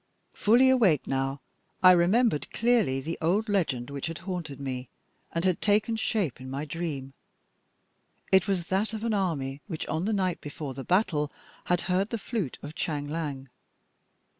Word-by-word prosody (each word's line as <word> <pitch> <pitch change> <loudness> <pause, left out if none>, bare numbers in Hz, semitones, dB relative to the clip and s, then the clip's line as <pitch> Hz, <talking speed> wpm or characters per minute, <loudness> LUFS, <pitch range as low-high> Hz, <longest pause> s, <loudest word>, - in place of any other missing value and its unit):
Fully 245 +5 +5
awake 200 - +4
now, 135 +1 -1 0.4
I 185 - +10
remembered 180 +1 +3
clearly 225 - +2
the 165 +5 -4
old 195 +7 +2
legend 145 - 0
which 140 +1 -3
had 165 -1 -5
haunted 170 -7 -4
me, 130 -2 -4 0.4
and 165 +2 -1
had 185 -2 +1
taken 215 +2 +2
shape 200 - -1
in 130 - -7
my 140 +3 -3
dream. 145 -4 -4 1.2
It 190 -1 +5
was 190 -3 +1
that 195 +3 +1
of 220 - -5
an 230 -1 0
army 145 -9 -1
which 160 -6 -4
on 160 +3 -2
the 220 - +1
night 185 -3 0
before 145 -1 -6
the 135 +1 -6
battle 170 -6 +1 0.3
had 175 -1 +2
heard 185 +3 0
the 230 - -2
flute 210 - -3
of 145 +2 -7
Chang 145 -2 -2
Liang. 145 -4 -4
170 Hz, 165 wpm, -28 LUFS, 140-200 Hz, 1.2 s, I